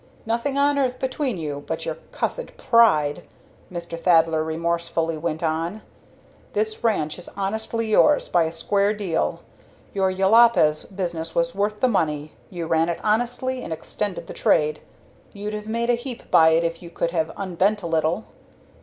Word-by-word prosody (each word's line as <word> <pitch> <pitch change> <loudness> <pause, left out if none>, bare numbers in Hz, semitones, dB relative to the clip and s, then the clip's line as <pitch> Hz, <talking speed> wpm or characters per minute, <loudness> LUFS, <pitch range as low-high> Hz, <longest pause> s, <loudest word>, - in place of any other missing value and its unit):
"Nothing 235 +5 -1
on 285 0 +3
earth 255 -2 0
between 260 -3 -2
you 145 -3 -4
but - - -3
your - - -1 0.2
cussed - - -3
pride!" 215 - +4 0.5
Mr. 170 -1 -6
Thaddler 165 -2 +4
remorselessly 165 0 -1
went 160 +1 -3
on. 165 +6 -2 0.7
"This 215 +1 -2
ranch 180 -9 0
is 180 - -11
honestly 220 +3 -2
yours 295 +6 +4
by 170 -2 +3
a 160 - -2
square 200 +5 +1
deal. 190 -6 -1 0.5
Your 190 -1 +1
Jopalez 195 -5 +4
business 170 -4 -4
was 170 0 +1
worth 210 +2 -1
the 255 - +5
money 155 -8 0 0.2
you 175 -3 -5
ran 165 +1 +2
it 170 - -2
honestly 245 +4 0
and - - -7
extended 180 +2 -4
the - - -8
trade. 150 0 +2 0.5
You'd 210 +1 -5
have 210 0 -5
made 235 +2 0
a - - +3
heap 240 0 -6
by 160 0 +7
it 165 +1 +3
if 165 0 -2
you 170 - -9
could 170 0 -2
have 160 -2 0
unbent 195 +2 0
a - - -4
little. 165 +4 0
185 Hz, 165 wpm, -23 LUFS, 165-220 Hz, 0.7 s, by